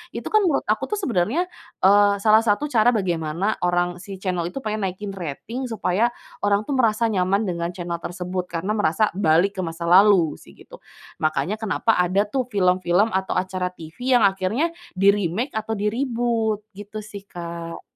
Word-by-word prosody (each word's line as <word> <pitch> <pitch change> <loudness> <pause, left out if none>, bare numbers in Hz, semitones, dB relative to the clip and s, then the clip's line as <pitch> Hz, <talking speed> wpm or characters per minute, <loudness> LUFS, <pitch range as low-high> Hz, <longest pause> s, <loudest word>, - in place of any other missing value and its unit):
Itu, - - -5
kan, 430 0 +5
menurut 300 - +1
aku, - - +1
tuh, 420 - -1
sebenarnya, 255 - 0 0.4
eee, 205 +1 +6
salah 220 +1 +5
satu 230 +7 +1
cara 235 +1 +4
bagaimana 175 0 -1
orang 175 0 +1
si 195 +1 -8
channel 180 -3 -1
itu 270 - -5
pengen 215 -2 -2
naikin 195 +2 -6
rating 210 - -5
supaya 225 0 +1 0.4
orang, 205 +1 +2
tuh, 280 - -1
merasa 230 -1 +2
nyaman 195 +2 +1
dengan 170 -3 -2
channel 170 -2 -4
tersebut, 180 +1 -4
karena 170 +5 -3
merasa 205 +2 +2
balik 190 +2 +3
ke - - +1
masa 165 +1 -6
lalu, 185 -4 +5
sih, - - -16
gitu. - - -15 0.4
Makanya 155 +6 0
kenapa 220 +1 +1
ada, 185 +3 +2
tuh, 255 -1 -1
film-film 185 0 +2
atau 190 0 -1
acara 185 0 -1
TV 180 +11 -3
yang - - +2
akhirnya 195 - 0 0.2
di-remake 200 - +1
atau 220 +1 -2
di-reboot 225 -1 -1
gitu, 205 +1 -8
sih, 205 -2 -9
Kak. 170 -2 -7
200 Hz, 165 wpm, -23 LUFS, 175-220 Hz, 0.4 s, eee